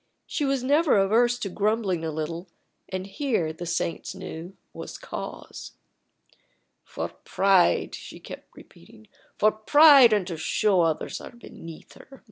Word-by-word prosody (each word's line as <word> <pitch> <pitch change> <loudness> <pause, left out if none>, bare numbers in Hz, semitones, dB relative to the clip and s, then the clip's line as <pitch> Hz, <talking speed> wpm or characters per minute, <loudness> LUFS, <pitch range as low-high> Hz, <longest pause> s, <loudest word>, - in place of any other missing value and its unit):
She 295 - -2
was 270 -2 0
never 290 0 +3
averse 230 +5 +3
to 215 - -4
grumbling 200 -3 -1
a 160 - -2
little, 160 +3 -5 0.4
and 185 0 -4
here, 195 - -2
the 175 +2 -8
saints 170 0 -3
knew, 170 +4 -9 0.2
was - - -8
cause. - - -8 1.1
"For - - -5
pride," 190 -2 +1
she - - -9
kept - - -12
repeating; 105 +6 -17 0.3
"for 215 - +4
pride, 275 +3 +7
and 205 -3 +2
to 175 -3 -6
show 190 +5 +1
that 170 - +4
others 155 - -4
are - - -9
beneath 165 -9 -12
her! 270 0 -16
195 Hz, 145 wpm, -25 LUFS, 170-240 Hz, 1.1 s, pride